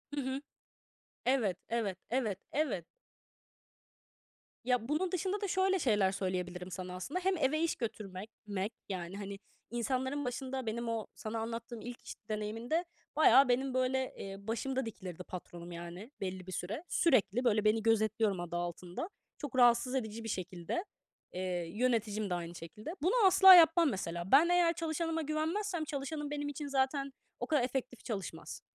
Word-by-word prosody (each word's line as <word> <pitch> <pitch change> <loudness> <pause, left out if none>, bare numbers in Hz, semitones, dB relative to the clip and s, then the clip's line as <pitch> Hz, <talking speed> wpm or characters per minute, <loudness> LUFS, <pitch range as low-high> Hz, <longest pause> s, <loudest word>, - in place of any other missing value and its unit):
Hı 285 - 0
hı. 265 +1 -2 0.8
Evet, 235 -8 +2
evet, 225 -5 -1
evet, 225 -7 0
evet. 265 - 0 1.8
Ya, 250 -1 +1
bunun 335 +5 0
dışında 380 +3 -1
da 405 - 0
şöyle 380 0 +2
şeyler 210 - +3
söyleyebilirim 180 -1 -3
sana, 180 +1 -5
aslında. 270 - -3
Hem 375 -1 +2
eve 305 +1 +2
iş 335 - +1
götürmek 210 -4 -5 0.2
mek, 200 +2 -2 0.2
yani, 185 0 -4
hani, 200 -1 -6 0.3
insanların 260 +4 -1
başında 260 +1 -3
benim 230 +1 -2
o 225 -2 -2
sana 220 +1 -4
anlattığım 230 +1 -5
ilk 245 +1 -7
iş - - -6 0.2
deneyimimde 225 +10 -1 0.3
bayağı 275 -3 +7
benim, 260 +2 +2
böyle, 255 0 +1
eee, 195 0 -6
başımda 260 +3 -1
dikilirdi 185 -5 -7
patronum 175 -1 -8
yani 175 +7 -8
belli 185 -1 -4
bir - - -6
süre. 200 - -4
Sürekli, 245 - +3
böyle, 215 -3 +3
beni, 215 +1 +3
"gözetliyorum" 220 -3 +2
adı 175 -1 -4
altında. 175 - -4 0.3
Çok 290 -4 -6
rahatsız 245 +1 +5
edici 225 -3 -3
bir 225 - -4
şekilde. 185 - -3 0.5
Eee, 180 - -3 0.3
yöneticim 215 -3 +1
de - - 0
aynı 170 -1 -4
şekilde. 210 - -7
Bunu 360 +6 +3
asla 380 0 +10
yapmam, 335 -1 +7
mesela. 175 -4 -3
Ben 310 +6 +7
eğer 350 -1 +4
çalışanıma 325 -1 -1
güvenmezsem 320 +4 -1
çalışanım 290 0 -4
benim 290 0 -2
için 290 +1 -5
zaten 275 0 0 0.3
o - - -3
kadar 300 -6 +3
efektif 250 -1 -3
çalışmaz. 200 -6 -5
235 Hz, 155 wpm, -33 LUFS, 195-290 Hz, 1.8 s, asla